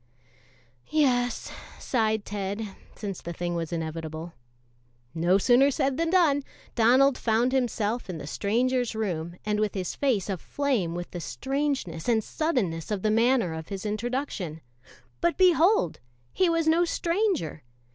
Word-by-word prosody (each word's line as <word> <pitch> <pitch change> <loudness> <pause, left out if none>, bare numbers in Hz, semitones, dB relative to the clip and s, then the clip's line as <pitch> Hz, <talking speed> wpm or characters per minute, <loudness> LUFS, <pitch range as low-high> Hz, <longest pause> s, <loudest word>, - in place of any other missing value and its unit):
"Yes," 245 -6 +1 0.3
sighed 220 -4 0
Ted, 205 +1 -3 0.3
since 200 -4 -5
the 170 - -6
thing 175 +1 -3
was 165 -1 -3
inevitable. 160 0 -5 0.8
No 170 +3 +3
sooner 245 +6 +5
said 270 -1 0
than 330 0 +1
done. 325 -6 +4 0.3
Donald 255 +4 +4
found 230 +2 +2
himself 240 -4 -1
in 175 - -4
the 150 - -7
stranger's 240 - 0
room 175 -6 -3
and 210 0 0
with 215 -1 0
his 185 -2 -2
face 245 -9 0
aflame 200 - -1
with 175 0 -5
the 175 - -5
strangeness 270 - -2
and 220 -2 +3
suddenness 205 - -1
of 205 -3 -2
the 215 - +2
manner 230 -5 +3
of 160 -1 -6
his 195 +1 -6
introduction. 215 - -3 0.6
But 340 0 +1
behold! 360 - +4 0.3
he 370 -2 +3
was 330 -1 +1
no 330 +2 +4
stranger. 340 - 0
220 Hz, 140 wpm, -27 LUFS, 180-275 Hz, 0.8 s, sooner